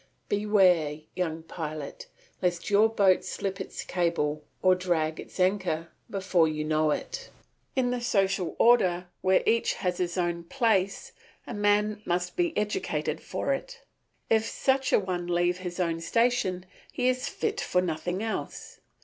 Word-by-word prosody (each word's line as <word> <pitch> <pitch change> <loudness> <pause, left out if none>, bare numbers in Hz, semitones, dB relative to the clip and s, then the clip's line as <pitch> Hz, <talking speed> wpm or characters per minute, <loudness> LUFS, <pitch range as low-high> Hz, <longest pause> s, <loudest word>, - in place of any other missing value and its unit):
Beware, 185 -8 +3
young 165 -3 -2
pilot, 155 -3 -6 0.3
lest 175 +1 -1
your 210 +2 +5
boat 195 -4 +3
slip 195 -1 -4
its - - -6
cable 155 -4 -1 0.2
or 185 0 +6
drag 170 -4 0
its - - -10
anchor 180 -3 +1 0.2
before 190 -4 +2
you 155 -1 -2
know 155 0 +2
it. - - -3 0.5
In 250 -2 +2
the 245 -1 -2
social 195 -6 +1
order 180 -7 +4
where 190 0 +3
each 230 0 +2
has 180 -2 -2
his 175 0 -1
own 170 -1 -1
place 220 - 0 0.3
a - - -6
man 210 0 +2
must 180 -1 -1
be 345 -2 0
educated 210 0 -1
for - - -1
it. - - -6 0.4
If 220 -1 +3
such 265 -1 +1
a - - +6
one 180 -3 -2
leave 175 +1 +1
his 180 -1 -6
own 165 -2 0
station 230 -3 +1 0.3
he 250 - 0
is 255 0 +1
fit 430 -1 -2
for 180 - +1
nothing 180 +3 -2
else. 225 -1 -5
185 Hz, 150 wpm, -28 LUFS, 175-210 Hz, 0.5 s, or